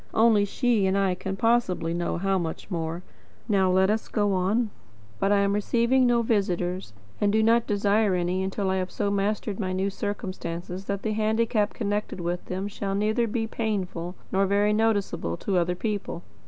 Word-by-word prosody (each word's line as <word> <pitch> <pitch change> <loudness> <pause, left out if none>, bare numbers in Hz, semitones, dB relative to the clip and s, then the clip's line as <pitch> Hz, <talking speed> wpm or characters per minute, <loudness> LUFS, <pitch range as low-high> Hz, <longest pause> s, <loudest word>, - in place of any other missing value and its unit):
Only 220 -2 +5
she 225 -2 +1
and 190 +1 +1
I 195 -2 +2
can 195 +2 -4
possibly 195 -7 +1
know 175 0 -1
how 195 +1 +1
much 165 +4 -5
more. 165 0 -3 0.4
Now 195 -4 +3
let 190 +2 +4
us 220 +1 -1
go 205 -2 +1
on... 205 +5 +1 0.5
But 195 - +2
I 200 -1 +4
am 200 0 +2
receiving 235 +5 +2
no 240 -1 +3
visitors, 185 - -1 0.3
and 205 - +3
do 220 +1 +3
not 230 +1 +3
desire 205 -1 +2
any 180 +1 0
until 190 0 -1
I 190 - +1
have 185 0 -2
so 205 -1 -1
mastered 200 +1 -1
my 185 -3 -1
new 190 +2 0
circumstances 185 -2 -5
that 200 0 -3
the 220 - 0
handicap 220 0 +1
connected 205 -3 -2
with 175 +1 -3
them 190 +2 -3
shall 200 -1 -3
neither 215 +3 +1
be 225 +1 -1
painful 190 -6 -3 0.2
nor 195 +1 +2
very 205 +2 +3
noticeable 205 - 0
to 190 - -1
other 175 +1 0
people. 200 -3 -3
200 Hz, 180 wpm, -26 LUFS, 185-215 Hz, 0.5 s, Only